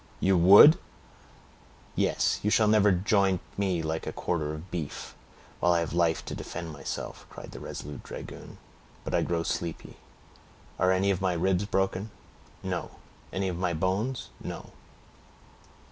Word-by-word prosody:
"You 95 0 +3
would!" 100 - +9 1.2
"Yes; - - +1
you 105 - +1
shall 110 0 +4
never 105 -1 +5
joint 95 0 +2 0.2
me 95 -4 0
like 80 +1 -3
a - - -1
quarter 75 -3 -2
of 85 +4 -10
beef, 80 -5 -5 0.5
while 90 0 +3
I 85 - +3
have 85 - -3
life 85 -2 +1
to - - -5
defend 85 -2 -6
myself," 70 -2 -6
cried - - -10
the - - -9
resolute 75 0 -7
dragoon. - - -9 0.5
"But - - -5
I - - +3
grow 85 -1 0
sleepy; 85 -1 -4 0.8
are 90 +1 +4
any 95 +1 +2
of 95 -1 -1
my 95 -2 +1
ribs 95 +3 +1
broken?" 95 +1 -1 0.5
"No." - - -3 0.4
"Any 95 0 -1
of 90 -2 -3
my 90 -2 0
bones?" 100 +9 -1
"No." - - -7
90 Hz, 150 wpm, -28 LUFS, 85-100 Hz, 1.2 s, would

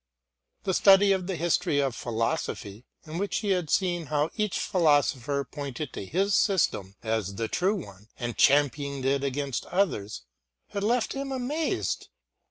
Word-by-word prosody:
The 190 - 0
study 195 +1 +6
of 185 -2 0
the 190 - -2
history 170 -1 +1
of 135 -4 0
philosophy, 115 -1 -3 0.2
in 160 +2 -5
which 200 +1 -1
he 205 - 0
had 180 -5 0
seen 175 -4 +1
how 150 +2 0
each 210 -3 -1
philosopher 145 - +2
pointed 140 -1 -6
to 95 - -6
his 195 - +1
system 130 - +1
as 110 -4 -1
the 115 +2 -2
true 190 - +1
one, 105 - -9
and 120 -1 -4
championed 140 -1 +2
it 140 +1 +1
against 140 -1 -2
others, 105 - -1 0.5
had 200 - -3
left 230 +1 +1
him 275 0 -4
amazed. 270 +5 -2
150 Hz, 155 wpm, -27 LUFS, 125-195 Hz, 0.5 s, study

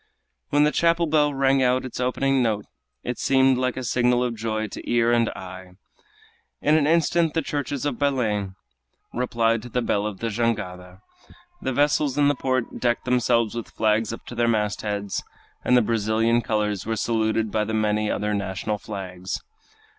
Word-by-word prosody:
When 145 +1 +4
the 150 - +3
chapel 170 +1 +2
bell 150 -2 +3
rang 135 -1 +2
out 130 0 +2
its 125 - -6
opening 135 +1 +1
note 110 -4 0 0.4
it - - -4
seemed 130 -1 +3
like 130 0 -1
a 130 - -3
signal 125 +1 +2
of 125 -1 -1
joy 110 0 -2
to - - -8
ear 120 0 +3
and 120 -1 +3
eye. 95 0 -9 0.9
In 150 +1 +3
an 150 -2 +3
instant 165 0 +2
the 165 - +1
churches 145 -1 -3
of 140 -5 -2
Belem 110 -9 0 0.6
replied 115 -2 +1
to 125 - -9
the 125 +1 -1
bell 105 -2 0
of 105 -3 -6
the 115 -1 -2
jangada. 95 -5 -3 0.6
The 130 - -1
vessels 145 0 +2
in 145 -1 +4
the - - +3
port 130 -2 -2
decked 120 -1 0
themselves 120 -3 +2
with 115 -1 -5
flags 110 0 +1
up 115 - -8
to - - -8
their 120 0 +1
mastheads, 105 -2 -1 0.4
and 125 - +4
the 120 - +4
Brazilian 115 +1 +1
colors 105 -4 -1
were 115 +1 -2
saluted 110 -1 0
by 110 - +1
the 110 +1 -2
many 105 0 +1
other 105 0 -1
national 100 +1 -2
flags. 95 -3 -5
115 Hz, 175 wpm, -24 LUFS, 105-130 Hz, 0.9 s, When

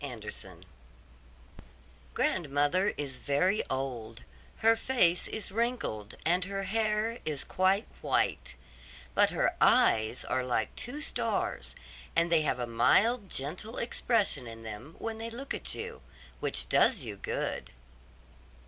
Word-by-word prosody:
GRANDMOTHER 105 -8 -7 1.6
Grandmother 145 +6 +2
is 140 -3 -4
very 180 +9 +2
old, 125 -4 -4 0.4
her 225 0 +7
face 225 -8 +3
is 220 -2 -3
wrinkled, 225 - -2
and 180 +3 +3
her 195 0 -3
hair 215 +3 0
is 150 -3 -3
quite 190 +3 +2 0.2
white; - - 0 0.6
but - - +5
her - - +1
eyes 110 +2 +4
are 130 - 0
like 120 -3 -1
two 275 +6 -6
stars, - - -2 0.4
and 170 0 +3
they 165 -2 +5
have 150 -4 0
a 125 - -2
mild, 200 - +3
gentle 175 - -5
expression 220 - 0
in 115 0 -9
them 110 +8 -8
when 225 -1 -4
they 225 +1 -4
look 250 +4 -5
at - - -3
you, 465 +1 -6 0.4
which - - -1
does 235 -8 +4
you 110 -5 -6
good. 100 - -3
170 Hz, 130 wpm, -30 LUFS, -, 1.6 s, her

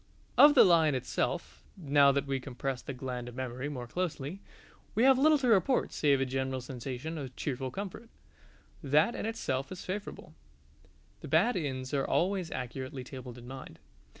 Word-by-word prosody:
Of 295 0 +8
the - - +9
Lion 160 -5 +4
itself, 130 - -2 0.2
now 145 -4 +4
that 140 0 0
we 135 -1 -1
compress 130 0 -4
the - - -6
gland 125 -2 -5
of 120 - -12
memory 130 +2 -4
more 125 -4 -5
closely, 170 +3 -4 0.5
we 225 - +3
have 265 0 +6
little 305 +2 +5
to 265 -3 -1
report 230 +4 +3
save 140 -3 +3
a 135 - +1
general 130 0 -2
sensation 130 +5 -6
of 130 -3 -7
cheerful 130 -2 -3
comfort. 200 - -7 0.7
That 150 - +3
in - - -3
itself 135 -12 -2
is 185 - -7
favourable: 200 +3 -6 0.9
the - - -9
bad 245 - +3
inns 130 -5 -3
are 140 -1 +1
always 185 +1 0
accurately 130 0 -5
tabled 125 -2 -9
in 120 0 -11
mind. 130 +1 -9
140 Hz, 170 wpm, -31 LUFS, 130-185 Hz, 0.9 s, the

